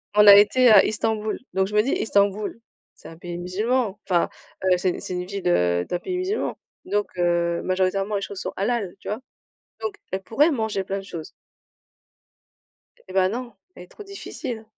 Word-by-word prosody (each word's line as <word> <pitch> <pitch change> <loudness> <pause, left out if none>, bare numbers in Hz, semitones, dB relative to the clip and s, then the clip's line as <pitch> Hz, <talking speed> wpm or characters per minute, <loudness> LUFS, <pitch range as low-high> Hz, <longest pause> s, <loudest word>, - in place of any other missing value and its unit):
on 210 - +7
a 200 - +12
été 245 +5 +6
à 210 -3 +8
Istanbul. 215 0 -1
Donc 190 0 +1
je 210 - -6
me 210 - +6
dis: 270 - -1
«Istanbul, 205 +1 +1 0.4
c'est - - -14
un 165 - -11
pays 175 0 -6
musulman, 210 +4 -1
enfin, 175 -3 +2 0.3
heu, 185 -1 +4
c'est 180 0 -1
c'est 185 - -6
une 180 0 -3
ville, 195 0 -4
heu, 90 - +2
d'un 175 - -3
pays 365 - -4
musulman». 380 +4 -2 0.3
Donc, 205 0 0
heu, 170 -1 +1
majoritairement 190 +2 0
les 200 - -1
choses 195 -1 -6
sont - - -5
halal, 200 -2 -1
tu - - -8
vois? 210 - -2 0.6
Donc, 425 -2 -3 0.2
elle 190 0 -2
pourrait 290 - +2
manger 220 -6 -1
plein 195 +1 -3
de - - -9
choses. 165 -5 -8 1.8
Eh 185 - -9
bah 185 -1 +4
non, 240 +3 -5 0.2
elle 180 - -11
est - - -17
trop 420 - -12
difficile. 275 - -7
200 Hz, 190 wpm, -24 LUFS, 185-225 Hz, 1.8 s, a